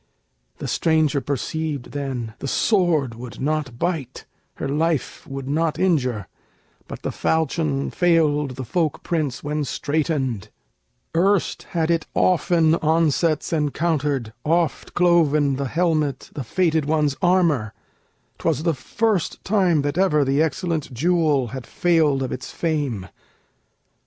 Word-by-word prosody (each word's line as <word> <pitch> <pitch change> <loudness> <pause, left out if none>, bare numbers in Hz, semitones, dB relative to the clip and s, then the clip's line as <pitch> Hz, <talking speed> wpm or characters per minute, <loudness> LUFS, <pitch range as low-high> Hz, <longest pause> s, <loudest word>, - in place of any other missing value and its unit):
The - - -5
stranger 155 -3 +2
perceived 145 +1 -3
then 130 -6 -4
The - - -4
sword 165 - +2
would 120 +1 -9
not 145 -3 -2
bite, 155 -5 -3 0.3
her - - -4
life 155 +1 -1
would 135 -1 -6
not 155 +2 0
injure, 130 - +1 0.6
But - - -8
the - - -2
falchion 155 -3 0
failed 150 -6 +2
the 130 0 -5
folk 160 +4 -1
prince 155 -7 -2
when 150 0 -1
straitened: 140 - -1 0.7
Erst 195 +2 +1
had 160 0 +2
it 165 -2 0
often 170 -3 +3
onsets 160 0 +1
encountered, 150 -5 0
Oft 165 +1 0
cloven 155 -6 +3
the 140 0 -2
helmet, 155 -3 0
the 140 - -4
fated 160 +2 +1
one's 150 -2 +1
armor; 170 - +2 0.7
'Twas 155 -2 0
the 165 -1 +2
first 195 - -1
time 185 -7 +2
that 145 +4 -1
ever 150 -7 +3
the 135 +3 +2
excellent 160 -1 -1
jewel 150 -2 +1
Had 130 +1 -7
failed 155 -6 +2
of 130 - -3
its 130 - -5
fame. 145 - -2
150 Hz, 125 wpm, -22 LUFS, 135-165 Hz, 0.7 s, often